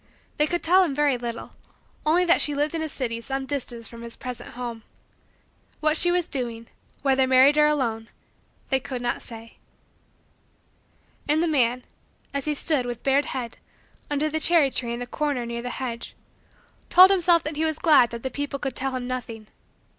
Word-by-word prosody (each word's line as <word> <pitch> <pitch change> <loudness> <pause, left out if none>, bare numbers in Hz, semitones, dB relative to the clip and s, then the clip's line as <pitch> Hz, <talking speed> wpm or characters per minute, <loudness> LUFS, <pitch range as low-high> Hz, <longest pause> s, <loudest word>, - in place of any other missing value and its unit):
They 300 - +3
could 345 +2 -2
tell 370 +3 +5
him 300 -7 -2
very 290 -2 +2
little; 235 -1 -6 0.6
only 350 +4 +4
that 345 - +4
she 295 - 0
lived 295 +2 0
in 325 - -2
a 315 - -3
city 235 -5 -3
some 270 +3 -4
distance 245 -4 -4
from 235 0 -11
his 235 0 -7
present 250 -2 -8
home. 240 -2 -6 1.0
What 310 0 +2
she 350 +2 +5
was 350 -1 +1
doing; 235 -4 -4 0.3
whether 265 -1 +3
married 260 +3 +6
or 300 0 +5
alone; 230 -7 -1 0.6
they 265 - +2
could 255 -1 -6
not 240 - -2
say. 230 -1 -12 1.7
And 310 +3 +3
the - - +1
man, 250 -5 +1 0.5
as 280 -1 -2
he 300 -1 -1
stood, 280 -4 +1
with 240 -1 -6
bared 275 +1 +2
head, 245 -3 -5 0.5
under 295 +1 0
the 310 +1 -2
cherry 315 -4 +4
tree 240 -2 -2
in 235 - -4
the - - -3
corner 280 -2 -2
near 235 0 -5
the 245 - -5
hedge, 240 -2 -6 0.7
told 370 +2 +8
himself 350 -3 +4
that 300 0 -4
he 310 - -1
was 315 -1 0
glad 300 -9 +5
that 235 0 -8
the 260 - -3
people 285 +1 -4
could 270 -3 -4
tell 270 0 -1
him 250 -1 -4
nothing. 230 -4 -6
270 Hz, 190 wpm, -24 LUFS, 240-300 Hz, 1.7 s, told